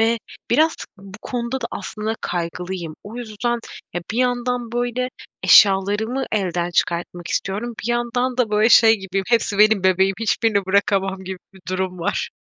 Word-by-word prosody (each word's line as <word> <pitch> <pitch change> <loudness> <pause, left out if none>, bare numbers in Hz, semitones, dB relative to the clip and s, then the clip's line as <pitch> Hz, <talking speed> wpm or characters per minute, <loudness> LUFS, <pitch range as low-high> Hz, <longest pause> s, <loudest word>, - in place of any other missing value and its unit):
ve 230 +1 +3 0.3
biraz 315 +6 +4 0.2
bu 195 +1 -12
konuda 245 +1 -3
da 235 - -2
aslında 215 +3 -4
kaygılıyım. 175 -1 -4
O 215 +3 -9
yüzden, 240 0 -2 0.3
ya, 175 - -2
bir 235 - -2
yandan, 245 -1 0
böyle, 245 +1 -1 0.3
eşyalarımı 205 +6 +4
elden 175 -4 -1
çıkartmak 175 0 -1
istiyorum, 215 +5 -2
bir 240 - -2
yandan 240 +1 -1
da, 245 -4 +1
böyle, 215 +2 +4
şey 225 -1 +7
gibiyim, 195 0 -3
hepsi 225 -3 +1
benim 210 -3 +5
bebeğim, 190 +1 +3
hiçbirini 215 -3 +1
bırakamam 195 -1 +1
gibi 190 0 -6 0.2
bir 190 - -15
durum 185 -1 -2
var. 170 - -2
210 Hz, 155 wpm, -21 LUFS, 190-240 Hz, 0.3 s, şey